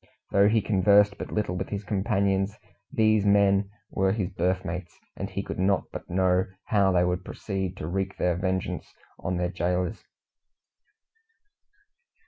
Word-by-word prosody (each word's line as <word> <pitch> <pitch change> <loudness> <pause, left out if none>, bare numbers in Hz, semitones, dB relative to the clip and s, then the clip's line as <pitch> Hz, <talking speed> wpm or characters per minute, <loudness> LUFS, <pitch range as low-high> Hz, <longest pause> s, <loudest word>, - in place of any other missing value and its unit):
Though 100 +1 +5
he 110 -1 +2
conversed 100 0 +4
but - - -6
little 105 -4 -1
with 95 +1 -3
his 100 0 -4
companions, 100 -1 0 0.3
these 110 -2 +3
men 100 -1 +4 0.2
were 95 0 +2
his 100 -4 -2
berth 95 0 0
mates, 90 +1 -5 0.2
and - - -4
he - - -3
could - - -6
not 95 +1 +2
but - - -8
know 90 0 +2 0.2
how 100 -3 +3
they 90 -1 +3
would 90 0 -1
proceed 95 -1 -4
to - - -5
wreak 95 +2 -2
their 90 -1 +1
vengeance 95 0 -3 0.2
on 90 +4 -2
their 90 0 -1
gaolers. 90 +2 -1
95 Hz, 150 wpm, -27 LUFS, 90-100 Hz, 0.3 s, Though